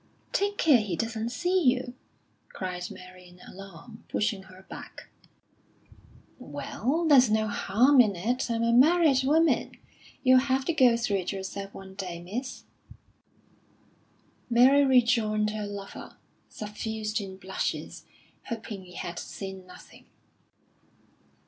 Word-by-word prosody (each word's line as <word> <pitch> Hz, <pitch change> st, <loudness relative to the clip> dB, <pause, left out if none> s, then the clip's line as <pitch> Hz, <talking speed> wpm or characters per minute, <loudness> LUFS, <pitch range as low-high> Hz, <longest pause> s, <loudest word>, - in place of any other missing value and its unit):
"Take 405 Hz, +1 st, 0 dB
care 295 Hz, -7 st, +5 dB
he 205 Hz, -5 st, -3 dB
doesn't 225 Hz, +4 st, -3 dB
see 360 Hz, +9 st, 0 dB
you!" 250 Hz, -3 st, +1 dB, 0.6 s
cried 180 Hz, -1 st, -5 dB
Mary 185 Hz, 0 st, -12 dB
in 180 Hz, 0 st, -18 dB
alarm, 195 Hz, +4 st, -12 dB
pushing 210 Hz, -2 st, -1 dB
her 190 Hz, 0 st, -16 dB
back. -, -, -11 dB, 1.3 s
"Well, 320 Hz, +7 st, -3 dB
there's 260 Hz, -6 st, +6 dB
no 215 Hz, 0 st, +1 dB
harm 250 Hz, +6 st, +4 dB
in 210 Hz, -5 st, +1 dB
it. 240 Hz, +9 st, -2 dB
I'm 230 Hz, 0 st, 0 dB
a 230 Hz, 0 st, +2 dB
married 290 Hz, +1 st, +5 dB
woman. 320 Hz, +4 st, +2 dB, 0.5 s
You'll 255 Hz, -1 st, +6 dB
have 265 Hz, 0 st, 0 dB
to 335 Hz, -, 0 dB
go 250 Hz, -6 st, +5 dB
through 225 Hz, -4 st, 0 dB
it 185 Hz, -1 st, -3 dB
yourself 195 Hz, 0 st, -6 dB
one 190 Hz, 0 st, -10 dB
day, 185 Hz, -3 st, -6 dB
miss." 215 Hz, +10 st, -6 dB, 1.9 s
Mary 255 Hz, +4 st, +6 dB
rejoined 230 Hz, -5 st, +3 dB
her 210 Hz, -1 st, -4 dB
lover, 200 Hz, -1 st, -9 dB, 0.3 s
suffused 215 Hz, 0 st, -4 dB
in 190 Hz, -1 st, -8 dB
blushes, 190 Hz, 0 st, -4 dB, 0.4 s
hoping 215 Hz, -5 st, -6 dB
he 180 Hz, -, -14 dB
had 175 Hz, -, -5 dB
seen 190 Hz, -2 st, -8 dB
nothing. 180 Hz, -, -15 dB
220 Hz, 125 wpm, -27 LUFS, 195-255 Hz, 1.9 s, there's